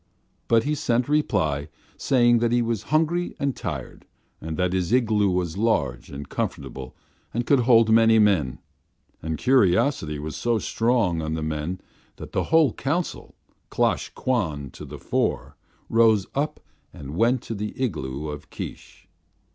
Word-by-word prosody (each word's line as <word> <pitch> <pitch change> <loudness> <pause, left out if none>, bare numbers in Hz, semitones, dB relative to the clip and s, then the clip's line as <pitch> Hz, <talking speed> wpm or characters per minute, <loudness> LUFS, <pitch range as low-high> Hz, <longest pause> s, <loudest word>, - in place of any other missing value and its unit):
But 115 -1 +4
he 150 - 0
sent 120 -4 0
reply, 85 - 0 0.3
saying 120 -2 +3
that 115 0 +1
he 120 0 +2
was 115 -3 -1
hungry 165 +4 +1
and 140 -2 -1
tired; - - -6 0.3
also 80 0 -5
that 90 +1 0
his 95 0 -1
igloo 110 -5 +3
was 90 0 -1
large 70 - 0
and 70 0 -8
comfortable 65 -1 -5 0.4
and 120 +1 -1
could 140 +1 +4
hold 115 -2 +5
many 115 0 +6
men. 95 - +2 0.6
And 80 0 -3
curiosity 95 - +2
was 75 0 -6
so 120 -1 0
strong 110 -7 +1
on 80 0 -2
the 80 - -3
men 80 +4 -3 0.3
that - - -10
the - - -1
whole 160 -6 +4
council, 165 +6 -3 0.3
Klosh - - 0
Kwan 80 - -1
to - - -10
the - - -9
fore, - - -2 0.3
rose 110 -3 +4
up 145 +2 -2 0.3
and 70 +1 -9
went 115 +5 +2
to - - -5
the 105 0 -5
igloo 75 - -3
of 75 0 -8
Keesh. 90 +3 -9
105 Hz, 155 wpm, -24 LUFS, 80-120 Hz, 0.6 s, many